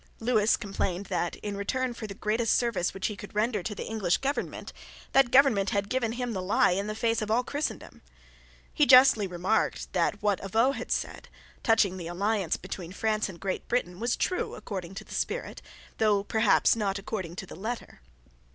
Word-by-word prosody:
Lewis 225 Hz, -2 st, +3 dB
complained 195 Hz, -2 st, -3 dB
that, 175 Hz, -3 st, -2 dB
in 205 Hz, -1 st, -3 dB
return 245 Hz, +6 st, -1 dB
for 225 Hz, -2 st, -7 dB
the 200 Hz, -, -8 dB
greatest 220 Hz, +3 st, +1 dB
service 230 Hz, -8 st, 0 dB
which 195 Hz, -, -5 dB
he 210 Hz, -, -1 dB
could 210 Hz, 0 st, -11 dB
render 215 Hz, 0 st, +1 dB
to 210 Hz, +4 st, -4 dB
the -, -, -5 dB
English 200 Hz, -6 st, +1 dB
government, 275 Hz, +2 st, -3 dB, 0.4 s
that 270 Hz, -2 st, +5 dB
government 245 Hz, -7 st, +4 dB
had 200 Hz, 0 st, -1 dB
given 240 Hz, -3 st, 0 dB
him 245 Hz, -1 st, -3 dB
the 190 Hz, -, -3 dB
lie 205 Hz, +3 st, +3 dB
in 200 Hz, +3 st, -1 dB
the 215 Hz, -, -3 dB
face 225 Hz, 0 st, 0 dB
of 215 Hz, -, -3 dB
all 235 Hz, +3 st, +2 dB
Christendom. 290 Hz, +4 st, -4 dB, 0.7 s
He 295 Hz, -3 st, +3 dB
justly 255 Hz, -6 st, +7 dB
remarked 180 Hz, +4 st, -1 dB
that 205 Hz, -, +1 dB
what 205 Hz, -2 st, +1 dB
Avaux 225 Hz, +7 st, +2 dB
had -, -, -6 dB
said, -, -, -3 dB, 0.3 s
touching 215 Hz, -5 st, +3 dB
the 170 Hz, -2 st, -6 dB
alliance 195 Hz, 0 st, 0 dB
between 180 Hz, -1 st, -7 dB
France 215 Hz, 0 st, 0 dB
and 170 Hz, -3 st, -10 dB
Great 190 Hz, -1 st, -3 dB
Britain, 180 Hz, -7 st, -1 dB
was 235 Hz, +2 st, 0 dB
true 365 Hz, -, -1 dB
according 190 Hz, -3 st, -6 dB
to -, -, -6 dB
the -, -, -12 dB
spirit, -, -, -3 dB, 0.4 s
though 210 Hz, -2 st, +3 dB
perhaps 220 Hz, +2 st, +3 dB
not 200 Hz, -3 st, -1 dB
according 195 Hz, -4 st, -5 dB
to 190 Hz, -, -6 dB
the -, -, -10 dB
letter. 220 Hz, -, -6 dB
210 Hz, 190 wpm, -28 LUFS, 195-235 Hz, 0.7 s, justly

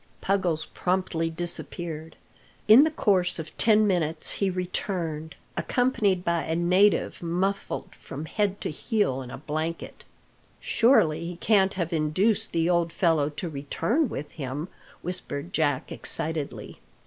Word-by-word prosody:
Puggles 180 Hz, -5 st, 0 dB
promptly 180 Hz, -3 st, 0 dB
disappeared. 165 Hz, -1 st, -4 dB, 0.5 s
In 230 Hz, +8 st, +9 dB
the -, -, +2 dB
course 185 Hz, -, +2 dB
of 160 Hz, -1 st, -7 dB
ten 215 Hz, -1 st, +5 dB
minutes 165 Hz, -5 st, 0 dB
he 200 Hz, -, 0 dB
returned, 175 Hz, -3 st, -3 dB, 0.2 s
accompanied 220 Hz, -8 st, +1 dB
by 170 Hz, -1 st, +1 dB
a 160 Hz, -, -2 dB
native 180 Hz, +5 st, +3 dB
muffled 180 Hz, +4 st, -2 dB
from 145 Hz, +3 st, -8 dB
head 200 Hz, +2 st, -1 dB
to -, -, -2 dB
heel 155 Hz, -, 0 dB
in 125 Hz, -, -8 dB
a -, -, -7 dB
blanket. 155 Hz, +3 st, -4 dB, 0.6 s
"Surely 170 Hz, -, +3 dB
he 175 Hz, +1 st, -5 dB
can't 195 Hz, +1 st, +3 dB
have 170 Hz, -3 st, -2 dB
induced 165 Hz, +8 st, +1 dB
the 165 Hz, 0 st, +1 dB
old 170 Hz, -1 st, +2 dB
fellow 165 Hz, -5 st, +2 dB
to 150 Hz, +4 st, -5 dB
return 170 Hz, -, 0 dB
with 145 Hz, -5 st, -6 dB
him!" 145 Hz, +3 st, -5 dB, 0.3 s
whispered 175 Hz, -2 st, -4 dB
Jack 145 Hz, -4 st, 0 dB
excitedly. 155 Hz, -2 st, -3 dB
170 Hz, 135 wpm, -26 LUFS, 155-195 Hz, 0.6 s, In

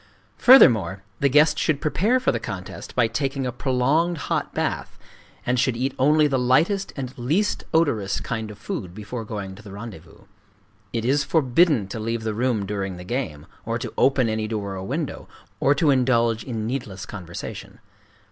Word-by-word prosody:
Furthermore, 105 Hz, -, +6 dB, 0.2 s
the 140 Hz, -, +3 dB
guest 150 Hz, +3 st, +4 dB
should 155 Hz, -3 st, +1 dB
prepare 195 Hz, -, +1 dB
for 255 Hz, -, +2 dB
the -, -, -2 dB
contest 95 Hz, -4 st, -7 dB
by 125 Hz, -, +4 dB
taking 135 Hz, +4 st, -2 dB
a 125 Hz, -, -1 dB
prolonged 140 Hz, +8 st, +1 dB
hot -, -, -2 dB
bath, -, -, -3 dB, 0.5 s
and 125 Hz, 0 st, +1 dB
should 120 Hz, -1 st, +1 dB
eat 130 Hz, +2 st, -1 dB
only 150 Hz, +3 st, +4 dB
the 135 Hz, -3 st, +1 dB
lightest 160 Hz, +11 st, +2 dB
and 130 Hz, -1 st, -5 dB
least 160 Hz, +13 st, 0 dB
odorous 145 Hz, -12 st, +1 dB
kind 110 Hz, -2 st, -4 dB
of 105 Hz, -, -10 dB
food 95 Hz, -4 st, -6 dB
before 110 Hz, +3 st, -6 dB
going 100 Hz, -3 st, -6 dB
to 100 Hz, -, -13 dB
the 105 Hz, -2 st, -11 dB
rendezvous. 100 Hz, -6 st, -10 dB, 0.7 s
It 115 Hz, -1 st, -2 dB
is 140 Hz, +3 st, +2 dB
forbidden 140 Hz, -, +3 dB
to 110 Hz, -, -5 dB
leave 115 Hz, +1 st, -2 dB
the 110 Hz, -1 st, -2 dB
room 115 Hz, -2 st, 0 dB
during 95 Hz, -2 st, -3 dB
the 90 Hz, -, -8 dB
game, 90 Hz, -, -4 dB, 0.2 s
or 115 Hz, +1 st, -2 dB
to 120 Hz, -, -6 dB
open 135 Hz, -3 st, +3 dB
any 110 Hz, -1 st, -1 dB
door 100 Hz, -3 st, -3 dB
or 95 Hz, -, -5 dB
window, 145 Hz, +2 st, -4 dB, 0.3 s
or 140 Hz, +5 st, +3 dB
to 155 Hz, -2 st, +3 dB
indulge 120 Hz, -4 st, +2 dB
in 115 Hz, -4 st, -4 dB
needless 110 Hz, -6 st, -4 dB
conversation. 90 Hz, -4 st, -8 dB
120 Hz, 175 wpm, -23 LUFS, 105-140 Hz, 0.7 s, Furthermore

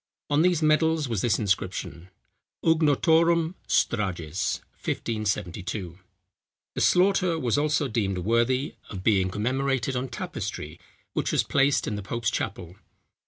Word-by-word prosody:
On 145 Hz, +1 st, +4 dB
these 175 Hz, -2 st, +2 dB
medals, 155 Hz, 0 st, +3 dB
was 115 Hz, -5 st, -1 dB
this 120 Hz, -, +2 dB
inscription, 95 Hz, -3 st, -2 dB, 0.6 s
"Ugonottorum 165 Hz, +1 st, +3 dB
Strages, 95 Hz, -6 st, 0 dB, 0.2 s
1572." 100 Hz, -4 st, -3 dB, 0.7 s
The -, -, -3 dB
slaughter 180 Hz, -2 st, +3 dB
was 120 Hz, -8 st, 0 dB
also 145 Hz, -1 st, +1 dB
deemed 105 Hz, -5 st, -1 dB
worthy 120 Hz, -, +1 dB, 0.2 s
of 95 Hz, -3 st, -7 dB
being 95 Hz, -4 st, +3 dB
commemorated 130 Hz, +5 st, -1 dB
on 125 Hz, +2 st, -2 dB
tapestry, 75 Hz, -7 st, -5 dB, 0.3 s
which -, -, -1 dB
was -, -, +2 dB
placed 140 Hz, 0 st, +2 dB
in 105 Hz, -, -3 dB
the -, -, -4 dB
pope's 115 Hz, +4 st, -2 dB
chapel. 90 Hz, -6 st, -4 dB
120 Hz, 120 wpm, -26 LUFS, 100-155 Hz, 0.7 s, On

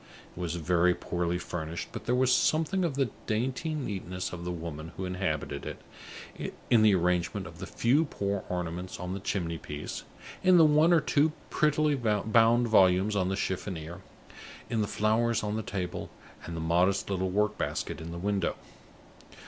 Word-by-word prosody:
It -, -, -10 dB
was 85 Hz, -2 st, -2 dB
very 85 Hz, +1 st, +2 dB
poorly 90 Hz, 0 st, -2 dB
furnished; 85 Hz, -1 st, -5 dB
but -, -, -8 dB
there 125 Hz, -, +3 dB
was 130 Hz, 0 st, +3 dB
something 165 Hz, +7 st, +2 dB
of 165 Hz, -6 st, 0 dB
the 135 Hz, -5 st, 0 dB, 0.2 s
dainty 130 Hz, +8 st, -1 dB
neatness 95 Hz, -9 st, -4 dB
of 85 Hz, -1 st, -6 dB
the 90 Hz, -, -2 dB
woman 80 Hz, -2 st, -6 dB
who 95 Hz, -, -3 dB
inhabited 90 Hz, -5 st, -2 dB
it -, -, -10 dB, 0.2 s
in 115 Hz, -, +6 dB
the 105 Hz, -2 st, +6 dB
arrangement 90 Hz, +2 st, 0 dB
of 85 Hz, -2 st, -11 dB
the -, -, -6 dB
few 140 Hz, +8 st, +2 dB
poor 100 Hz, -7 st, -2 dB
ornaments 90 Hz, 0 st, -4 dB
on 90 Hz, +1 st, -4 dB
the 100 Hz, -, -4 dB
chimney 85 Hz, -4 st, -2 dB
piece, 75 Hz, 0 st, -6 dB, 0.4 s
in 185 Hz, -1 st, +6 dB
the 165 Hz, -, +8 dB
one 155 Hz, +3 st, +5 dB
or 170 Hz, -2 st, +5 dB
two 150 Hz, +1 st, +2 dB, 0.2 s
prettily 155 Hz, 0 st, +2 dB
bound 115 Hz, 0 st, +3 dB
volumes 95 Hz, -1 st, +4 dB
on 95 Hz, -2 st, +1 dB
the 95 Hz, -, 0 dB
chiffonier, 90 Hz, -3 st, -4 dB, 0.7 s
in 115 Hz, -2 st, +1 dB
the 105 Hz, -, 0 dB
flowers 110 Hz, +2 st, +1 dB
on 105 Hz, 0 st, -1 dB
the 110 Hz, -, -1 dB
table, 95 Hz, -4 st, -4 dB, 0.4 s
and 85 Hz, -, -6 dB
the -, -, -3 dB
modest 90 Hz, +4 st, +2 dB
little 95 Hz, -1 st, 0 dB
work 105 Hz, +2 st, 0 dB
basket -, -, -3 dB
in 80 Hz, +1 st, -6 dB
the 85 Hz, -, -6 dB
window. 100 Hz, +2 st, 0 dB
100 Hz, 175 wpm, -29 LUFS, 90-120 Hz, 0.7 s, the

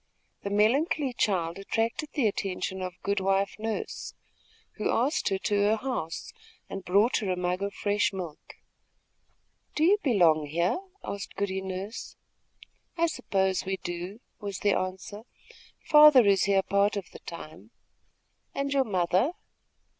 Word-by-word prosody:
The 200 Hz, -, -4 dB
melancholy 255 Hz, +7 st, +2 dB
child 180 Hz, -6 st, 0 dB
attracted 225 Hz, +8 st, -1 dB
the 275 Hz, -, +1 dB
attention 190 Hz, -2 st, -2 dB
of 180 Hz, -1 st, -5 dB
Good 200 Hz, 0 st, 0 dB
wife 195 Hz, 0 st, +1 dB
Nurse, 220 Hz, 0 st, -4 dB, 0.6 s
who 215 Hz, -, -1 dB
asked 280 Hz, +7 st, +1 dB
her 195 Hz, -, 0 dB
to 200 Hz, -, -2 dB
her 215 Hz, +2 st, +4 dB
house 220 Hz, -9 st, -4 dB, 0.3 s
and 195 Hz, -, -6 dB
brought 200 Hz, +7 st, +3 dB
her 205 Hz, -5 st, -2 dB
a 180 Hz, -, -1 dB
mug 180 Hz, +1 st, -1 dB
of 200 Hz, 0 st, -3 dB
fresh 205 Hz, 0 st, +1 dB
milk. 175 Hz, -6 st, -8 dB, 1.2 s
"Do 305 Hz, -, +1 dB
you 400 Hz, +5 st, +5 dB
belong 170 Hz, -, +3 dB
here?" 170 Hz, -, 0 dB, 0.2 s
asked 200 Hz, -1 st, -6 dB
Goody 190 Hz, -1 st, -2 dB
Nurse. 190 Hz, +4 st, -6 dB, 0.8 s
"I 335 Hz, -, +3 dB
suppose 195 Hz, -, 0 dB
we 190 Hz, 0 st, -2 dB
do," 175 Hz, +4 st, -6 dB, 0.2 s
was 200 Hz, -3 st, -5 dB
the 205 Hz, -1 st, +3 dB
answer. 185 Hz, +3 st, -4 dB, 0.6 s
"Father 300 Hz, -5 st, +8 dB
is 195 Hz, -1 st, +4 dB
here 195 Hz, -1 st, +3 dB
part 200 Hz, +2 st, +2 dB
of 200 Hz, -, -4 dB
the -, -, -11 dB
time." 170 Hz, +4 st, -10 dB, 0.9 s
"And 280 Hz, 0 st, -1 dB
your 270 Hz, -1 st, +3 dB
mother?" 190 Hz, -, +1 dB
200 Hz, 145 wpm, -28 LUFS, 185-225 Hz, 1.2 s, Father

